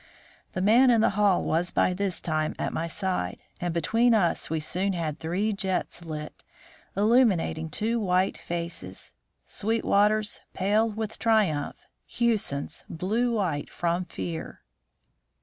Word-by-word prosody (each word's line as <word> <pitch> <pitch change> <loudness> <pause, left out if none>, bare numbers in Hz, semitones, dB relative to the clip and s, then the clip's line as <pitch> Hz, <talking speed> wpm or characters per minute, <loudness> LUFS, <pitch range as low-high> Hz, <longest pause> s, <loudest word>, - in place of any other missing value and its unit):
The 185 - -1
man 240 +6 +6
in 230 -2 +5
the - - +3
hall 200 -2 +3
was 170 +3 0
by 180 - +2
this 190 -1 0
time 155 -1 -1
at - - -2
my 165 - -2
side, 175 - -2 0.2
and 175 0 -2
between 225 +8 +3
us 175 -6 +1
we 160 0 0
soon 185 +5 -1
had 160 -4 -3
three 190 +7 -1
jets 190 -3 -2
lit, 155 -2 -7 0.5
illuminating 205 -8 +3
two 225 +9 0
white 185 -2 +1
faces: 170 - -6 0.3
Sweetwater's 210 -1 +1 0.2
pale 210 +4 +2
with 220 0 -5
triumph, 205 -11 +1 0.2
Hewson's 215 -12 -1
blue 220 +8 0
white 170 -9 -1
from 175 +1 -1
fear. 90 - -6
185 Hz, 130 wpm, -27 LUFS, 165-215 Hz, 0.5 s, man